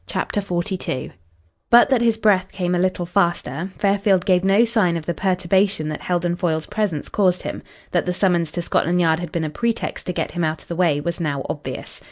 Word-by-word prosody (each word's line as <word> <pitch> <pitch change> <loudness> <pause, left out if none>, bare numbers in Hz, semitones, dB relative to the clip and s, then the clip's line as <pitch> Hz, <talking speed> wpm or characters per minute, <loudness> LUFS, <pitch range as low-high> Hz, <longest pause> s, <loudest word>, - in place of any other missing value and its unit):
CHAPTER 205 - -1
XLII 180 -6 -3 0.6
But 240 +3 +7
that 255 -3 +3
his 230 -2 +2
breath 195 -4 +2
came 180 -2 -2
a 175 - +1
little 185 -1 0
faster, 175 -3 0
Fairfield 195 -2 +2
gave 185 -2 +3
no 195 +4 +4
sign 210 -8 +1
of 160 - -7
the 170 - -1
perturbation 185 -2 +1
that 155 - -5
Heldon 175 -1 0
Foyle's 160 -4 -1
presence 200 -9 -2
caused 185 -3 +1
him. - - -5 0.3
That - - 0
the - - +2
summons 175 -3 +1
to 175 - -2
Scotland 170 +2 +1
Yard 160 -2 +3
had 175 -2 -6
been 170 - -2
a 155 - -2
pretext 230 +7 -2
to 180 - -1
get - - -2
him 175 -1 -2
out 155 0 -2
of - - -23
the 170 - -3
way 165 -5 +2
was 170 +3 -3
now 145 -5 -2
obvious. - - -6
180 Hz, 215 wpm, -21 LUFS, 170-195 Hz, 0.6 s, But